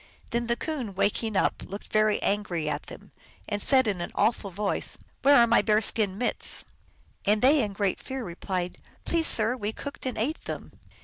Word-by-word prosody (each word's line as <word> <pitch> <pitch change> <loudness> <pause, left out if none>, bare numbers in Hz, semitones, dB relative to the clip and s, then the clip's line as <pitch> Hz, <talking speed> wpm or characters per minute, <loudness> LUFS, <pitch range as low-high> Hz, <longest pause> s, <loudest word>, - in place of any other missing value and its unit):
Then 235 0 -1
the 235 - +1
Coon, 250 - -4
waking 210 +2 0
up, - - +1
looked 200 +2 -9
very 215 0 +3
angry 185 -6 -1
at - - -3
them, - - -12 0.4
and 205 -1 -2
said 260 0 +5
in 195 -4 -1
an 175 - -3
awful 220 -3 +1
voice, 200 +2 -3
" - - -38
Where 285 +1 +6
are 235 - +7
my 235 0 +4
bear 215 -1 +3
skin 205 -3 +3
mitts? 245 - -2 0.3
" - - -31
And 210 +2 +3
they, 280 +3 +6
in 205 -4 -2
great 195 -1 -1
fear, 265 -1 -5
replied, 180 -1 -4
" - - -31
Please, 330 -1 +2
sir, 225 +2 +3
we 210 -4 -3
cooked 285 +1 -6
and 255 - -3
ate 280 +9 -2
them." - - -6
215 Hz, 205 wpm, -27 LUFS, 200-245 Hz, 0.4 s, are